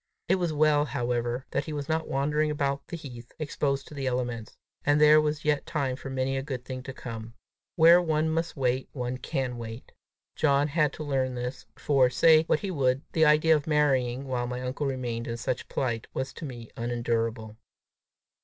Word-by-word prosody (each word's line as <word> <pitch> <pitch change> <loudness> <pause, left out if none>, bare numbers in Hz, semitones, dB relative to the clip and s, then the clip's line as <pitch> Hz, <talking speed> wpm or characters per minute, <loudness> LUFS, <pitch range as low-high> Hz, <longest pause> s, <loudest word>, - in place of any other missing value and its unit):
It 190 - +3
was 175 -3 0
well, 150 -1 +3
however, 120 -1 -2
that - - -1
he 155 - -5
was 145 -1 -4
not 160 0 -1
wandering 150 +3 +1
about 140 -2 -1
the 170 - -5
heath, 120 -6 -10
exposed 140 -2 -2
to - - -11
the 135 -2 -3
elements! 120 -3 -3 0.3
and 145 +1 +3
there 150 0 +7
was 150 0 -2
yet 150 -1 +1
time 140 -6 -1
for 135 +1 -8
many 130 0 -1
a 135 - -1
good 130 -3 -5
thing 130 0 -5
to 135 - -7
come! 115 -3 -8 0.4
Where 170 +2 +7
one 155 -2 +1
must 165 0 -2
wait, 130 0 0
one 125 -1 -3
can 130 -3 -3
wait. 115 +1 -8 0.4
John 145 -1 +2
had 150 -1 +2
to 155 - -6
learn 130 -3 -1
this, 125 +1 -5
for, 135 -3 +3
say 160 +5 +5
what 155 - +1
he 195 - -3
would, 135 -3 +1
the 160 -1 +4
idea 155 +1 +5
of 150 0 -2
marrying 135 -4 +2
while 125 -2 -1
my 125 0 -4
uncle 130 +3 -2
remained 120 -3 -3
in 115 0 -3
such 120 +1 -3
plight, 115 -4 -2
was 130 +1 -3
to 165 - -7
me 120 -5 -8
unendurable. 115 -2 -2
135 Hz, 195 wpm, -28 LUFS, 125-150 Hz, 0.4 s, there